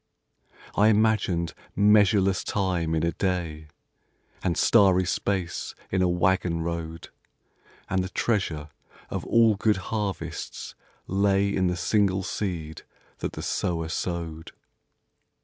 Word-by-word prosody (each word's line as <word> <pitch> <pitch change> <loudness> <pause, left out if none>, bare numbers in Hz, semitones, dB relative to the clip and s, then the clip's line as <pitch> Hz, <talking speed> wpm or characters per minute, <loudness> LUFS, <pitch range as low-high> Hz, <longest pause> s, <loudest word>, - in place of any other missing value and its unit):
I 105 - +5
imagined 105 -7 +2 0.2
measureless 100 -2 +4
time 90 -5 0
in 80 - 0
a 85 - +2
day, 85 -5 -2 0.7
And 90 -3 0
starry 95 -5 +5
space 95 -1 -2 0.2
in 95 - +1
a 90 - +3
waggon 90 -1 +1
road, 85 -1 -5 0.8
And 95 -1 0
the 95 - -5
treasure 90 -10 -1 0.4
of - - -3
all 115 -1 +5
good 105 +1 +2 0.2
harvests 105 -3 -4 0.3
lay 100 +1 +2
In 95 -1 +2
the 90 0 -1
single 95 +1 +1
seed 85 -6 -4 0.4
that - - -3
the - - -6
sower 80 -2 -1
sowed. 85 -2 -4
95 Hz, 115 wpm, -26 LUFS, 85-100 Hz, 0.8 s, I